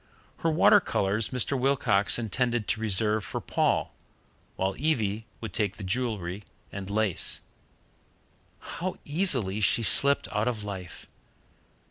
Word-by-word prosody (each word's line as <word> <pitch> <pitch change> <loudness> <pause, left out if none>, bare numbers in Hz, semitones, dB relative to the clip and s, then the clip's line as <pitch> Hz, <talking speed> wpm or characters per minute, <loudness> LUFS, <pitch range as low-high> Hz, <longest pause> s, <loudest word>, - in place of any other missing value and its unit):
Her 165 - 0
water 175 +6 +6
colours 105 - 0
Mr. 130 +2 0
Wilcox 130 -6 +2
intended 120 0 -1
to 110 - -1
reserve 105 0 +2
for - - -4
Paul, - - 0 0.6
while 95 +1 -1
Evie 115 -7 -1
would 110 - -6
take 105 -1 -1
the 105 - -8
jewellery 100 -3 -2 0.3
and 100 -1 -7
lace. 105 -3 +1 1.2
How 185 +2 -5
easily 140 - +1
she 105 +3 +2
slipped 140 +5 +3
out 105 +3 +1
of 115 -4 -2
life! 95 -4 -7
110 Hz, 125 wpm, -27 LUFS, 100-130 Hz, 1.2 s, water